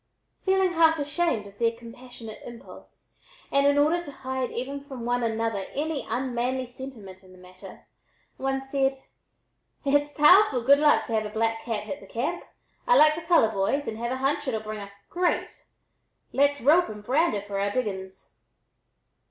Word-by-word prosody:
Feeling 380 -1 +2
half 325 -1 +4
ashamed 290 -5 -1
of 200 0 -15
their 230 -1 +2
compassionate 230 -1 -11
impulse 235 -1 -13 0.3
and 280 0 +3
in 285 0 +3
order 315 +4 +2
to 290 - -9
hide 260 -2 -4
even 275 +3 -5
from 265 -4 -8
one 245 0 0
another 225 -3 -1
any 305 0 -2
unmanly 250 +1 -1
sentiment 240 -7 -10
in 185 -1 -18
the - - -16
matter, 185 0 -14 0.5
one 270 0 -2
said: 270 0 0 0.9
"H'its 290 +1 +2
powerful 300 - +5
good 280 +3 +6
luck 300 0 +4
to 230 - -5
have 215 -1 0
a - - -8
black 225 +1 -1
cat 220 -3 -3
hit 280 +7 -6
the - - -14
camp! 280 +10 -3 0.4
I - - +5
like 305 0 +7
the 325 - -5
color, 330 -9 +3
boys, 200 +9 -1
and 220 - -4
have 235 +1 -3
a 260 - -2
hunch 280 +2 -1
it'll 220 -4 -1
bring 215 0 -6
us 200 0 -11
great; 355 0 -2 0.7
let's 285 +1 +2
rope 320 +8 +4
and 210 -1 -9
brand 290 +6 +2
her 200 - -2
for 200 -1 -5
our 200 +1 0
diggins." 190 -5 -5
255 Hz, 175 wpm, -26 LUFS, 220-290 Hz, 0.9 s, like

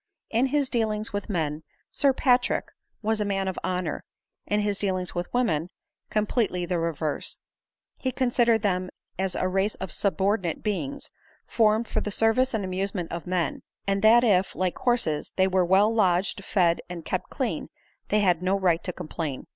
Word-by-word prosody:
In 235 +4 +3
his 280 0 +1
dealings 220 -3 -1
with 205 +1 -3
men, 155 -5 -1 0.3
Sir 280 - +3
Patrick 250 -1 +2 0.4
was 220 0 +1
a - - +3
man 195 -1 -1
of 190 - -3
honor; 180 -3 -2 0.4
in 210 0 +1
his 205 -1 -1
dealings 185 -3 -1
with 175 0 -4
women, 175 -10 +1 0.4
completely 210 -4 0
the 175 0 -1
reverse; 160 -2 -2 0.6
he 260 - -1
considered 240 -3 +2
them 185 -2 0 0.3
as 190 -1 -1
a 185 - 0
race 195 +3 0
of 190 - -6
subordinate 195 -3 0
beings, 275 +7 -3 0.3
formed 220 0 +2
for - - -1
the - - -3
service 225 +4 +2
and 205 -3 -1
amusement 185 -1 -3
of 170 +1 -5
men; 180 -2 -1 0.2
and 195 0 0
that 230 +3 +6
if, 195 -5 +2
like 185 -1 -1
horses, 235 -12 +1
they 190 0 +3
were 185 -1 +2
well 195 +5 +4
lodged, 195 -2 +1
fed, 175 -4 +2
and 170 -3 -7
kept - - -3
clean, - - -2 0.4
they 210 - +3
had 180 -4 +3
no 185 +2 +1
right 175 -4 +2
to 180 - -3
complain. 160 -5 -5
195 Hz, 170 wpm, -26 LUFS, 180-220 Hz, 0.6 s, that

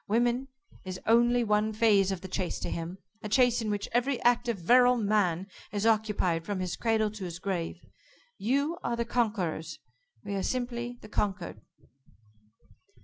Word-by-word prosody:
Woman 240 +4 +1 0.4
is 185 -1 -6
only 240 +2 +4
one 210 0 +1
phase 210 -3 +4
of 190 -2 -3
the 190 - -7
chase 185 -1 -2
to - - -3
him 170 +2 -4 0.2
a 210 - -5
chase 245 0 +4
in 220 - -2
which 205 -1 -2
every 250 +2 +1
active 240 -2 +2
virile 245 +7 +5
man 200 -5 +1 0.3
is 205 0 -2
occupied 210 -7 +2
from 200 +1 -3
his 180 -2 -2
cradle 220 -2 +1
to 215 -2 -8
his 175 -2 -5
grave. 180 -2 -4 0.5
You 280 - 0
are 235 - -1
the 235 0 -1
conquerors. 185 -10 -1 0.5
We 200 - -4
are 195 - -1
simply 245 +1 -3
the - - -11
conquered." 205 -2 -2
215 Hz, 160 wpm, -29 LUFS, 190-240 Hz, 0.5 s, virile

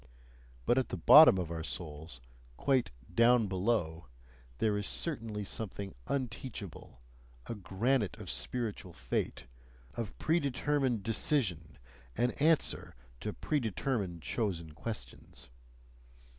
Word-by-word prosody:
But 120 - +4
at 130 - -2
the - - -3
bottom 145 - +9
of 90 -3 -3
our 80 -1 -3
souls, 75 -5 -6 0.4
quite 130 -9 +2 0.2
"down 115 +2 +5
below," 95 -4 -1 0.5
there 105 - +1
is 105 -1 -1
certainly 115 -10 -1
something 100 -1 -4
unteachable, 115 - -5 0.4
a - - -4
granite 105 +3 0
of - - -5
spiritual 110 -7 -3
fate, - - -3 0.5
of 115 +5 -5
predetermined 140 - +1
decision 110 - 0 0.4
and 120 +1 +2
answer 160 - +2 0.2
to - - -3
predetermined, 110 - -2
chosen 85 - -2
questions. 75 - -7
105 Hz, 105 wpm, -32 LUFS, 85-125 Hz, 0.5 s, bottom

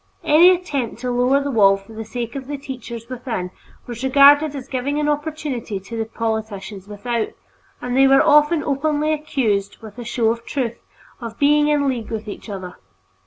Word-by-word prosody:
Any 320 +4 +7
attempt 290 -11 -1
to 250 -1 -2
lower 250 +3 +2
the 280 - -2
wall 195 -4 +5
for 195 +3 -15
the 225 0 -6
sake 235 +2 -5
of 265 -2 -6
the 290 0 -4
teachers 245 -4 -8
within 240 -8 -4 0.3
was 240 0 -7
regarded 285 +2 +6
as 270 -2 -7
giving 280 +2 -2
an 300 - 0
opportunity 295 -8 -3
to 200 +5 -9
the 225 -1 -2
politicians 220 -3 -4
without, 220 +2 -2 0.6
and 245 0 -2
they 270 +1 +6
were 270 0 +5
often 300 +1 +4
openly 300 +2 0
accused, 240 -10 -1
with 220 +2 -11
a - - -5
show 230 -1 +1
of 230 0 -5
truth, 240 -3 -3 0.4
of 230 -2 -8
being 295 +1 +4
in 295 -2 +2
league 245 -4 -2
with 220 -1 -5
each 210 - -8
other. 185 -3 -7
250 Hz, 185 wpm, -20 LUFS, 225-285 Hz, 0.6 s, Any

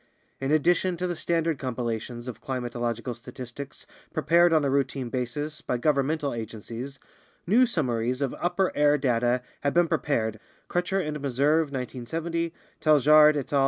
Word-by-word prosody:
In 135 +1 -1
addition 175 +3 +2
to 180 - -2
the 175 -1 -2
standard 165 -3 0
compilations 120 -1 -4
of 125 - -7
climatological 120 -2 -3
statistics 125 +3 -9 0.3
prepared 170 +3 +4
on 155 -3 +3
a - - +2
routine 135 -2 0
basis 140 +5 -3
by 125 - -1
governmental 145 +2 +1
agencies, 115 +4 -6 0.5
new 240 +8 +5
summaries 125 - 0
of 140 -2 -1
upper 185 +2 0
air 145 0 +4
data 125 -2 +1 0.2
have 140 +2 0
been 175 0 +5
prepared 110 -8 0 0.3
(Crutcher 180 +2 0
and 150 0 -3
Meserve, 145 +4 +2
1970; 160 +6 -3 0.3
Taljaard 150 0 +6
et 140 0 -4
al. 140 - +4
140 Hz, 145 wpm, -26 LUFS, 125-160 Hz, 0.5 s, Taljaard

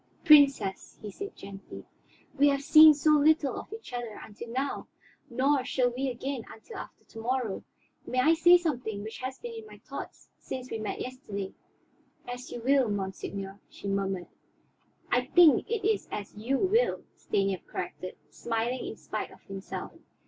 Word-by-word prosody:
"Princess," 280 - +5
he 210 - -7
said 400 - -7
gently, 195 0 -10 0.5
"we 285 - +5
have 280 -1 +2
seen 310 +1 +9
so 300 +1 +3
little 300 -2 +4
of - - -8
each 440 - -9
other 240 -3 -5
until 220 +2 -10
now, 265 +4 -2 0.4
nor 265 +3 +2
shall 250 -1 +1
we 265 +2 -2
again 260 +1 -4
until 225 - -11
after - - -10
to 225 - -11
morrow. 240 -3 -1 0.4
May 255 - 0
I 310 +6 +5
say 345 +2 +7
something 250 -11 -3
which 220 +1 -7
has 260 +1 -5
been 475 -1 -7
in 450 -1 -8
my - - -13
thoughts - - -9
since 255 -1 -6
we 225 - -3
met 215 - -4
yesterday?" 210 -7 -5 0.7
"As 245 +1 -7
you 240 - -6
will, 265 -1 +3
monseigneur," 195 0 -4
she - - -9
murmured. 195 -2 -1 0.9
"I 245 - +3
think 315 -5 +6
it 420 -3 0
is 435 -2 0
as 205 0 -6
you 235 +6 0
will," 435 - +2
Stanief 195 -2 -1
corrected, 185 +1 -5 0.2
smiling 235 +2 -2
in - - -6
spite - - -4
of - - -17
himself. 195 0 -6
255 Hz, 165 wpm, -29 LUFS, 210-295 Hz, 0.9 s, seen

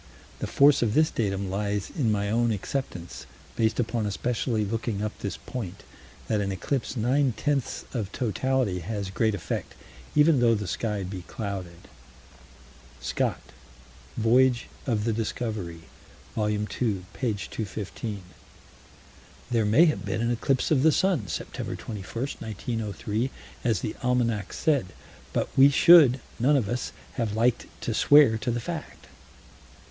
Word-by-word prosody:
The - - -3
force 140 0 +5
of 115 -3 +1
this 155 +1 +4
datum 100 -3 -1
lies 100 0 -2
in 130 -10 0
my 100 -1 0
own 120 +1 +2
acceptance, 100 -5 -4 0.3
based 110 +1 +1
upon 115 -2 0
especially 110 +1 -1
looking 110 -1 -2
up 105 - -1
this 100 - -4
point, 100 -8 -7 0.4
that 105 -2 +1
an 100 -1 -1
eclipse 130 +6 -2
nine 125 +2 +2
tenths 140 0 -1
of 110 -6 -3
totality 125 -4 0
has 100 +2 -4
great 110 +2 +1
effect, 95 - -4 0.4
even 150 -1 +5
though 115 -1 +4
the 105 -1 -3
sky 105 +2 -2
be 95 0 -5
clouded. 95 -5 -6 1.1
Scott - - -1 0.8
(Voyage 120 +2 +3 0.2
of 110 -4 +1
the 115 0 +1
Discovery, 105 -6 -3 0.5
vol. 105 -1 0
ii, 105 0 0 0.5
p. 125 -5 -1
215): 100 0 -5 1.3
"There 115 -3 +2
may 120 +11 +6
have 155 - 0
been 100 +2 -2
an 120 0 +1
eclipse 130 +4 0
of 140 -4 +4
the 160 +2 +6
sun, 180 - +1
Sept. 80 - -5 0.2
21, 110 - -6
1903, 110 - -3 0.3
as 115 -4 +1
the - - -3
almanac 120 -5 0
said, 140 -11 +1 0.4
but - - 0
we 135 +1 +8
should, 145 -3 +7 0.2
none 140 +5 +4
of 115 -7 0
us, 120 +4 -2 0.3
have 110 -4 -1
liked 120 +2 +2
to 115 - -2
swear 140 -2 +6
to 125 - -2
the 120 0 0
fact." 160 +5 -6
115 Hz, 140 wpm, -27 LUFS, 105-130 Hz, 1.3 s, we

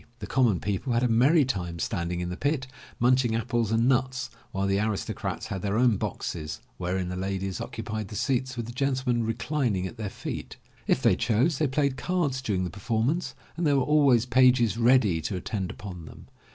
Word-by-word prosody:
The - - -6
common 120 -9 +2
people 105 +5 -2
had 120 +1 +2
a - - +4
merry 135 +7 +4
time 90 -9 -3
standing 85 -1 -2
in 90 - -3
the 90 - -4
pit, 145 - -1 0.3
munching 125 -1 +3
apples 115 -1 0
and 115 +2 +3
nuts, 130 0 0 0.2
while 95 +1 -1
the 100 0 +1
aristocrats 105 -1 -2
had 95 -2 -4
their 100 +2 -1
own 120 -3 +4
boxes 75 -4 -4 0.2
wherein 90 0 -2
the 90 - -4
ladies 95 0 -3
occupied 110 -1 -5
the 105 - -9
seats 130 +1 -1
with 120 - -3
the 120 - -7
gentle 130 -1 0
men 120 -1 0
reclining 115 -3 -1
at 115 - -7
their 105 -3 -3
feet. - - -6 0.3
If - - +2
they - - +5
chose, 125 +9 +1
they 155 - +2
played 140 0 0
cards 145 -4 -1
during 100 -7 -1
the 90 - -3
performance 115 - -1 0.2
and 170 - -3
there 145 -1 +4
were 135 - +3
always 140 -6 +4
pages 125 -3 +4
ready 115 -8 +3
to 95 - -3
attend 95 +1 -3
upon 90 -5 -8
them. - - -13
115 Hz, 200 wpm, -27 LUFS, 95-130 Hz, 0.3 s, they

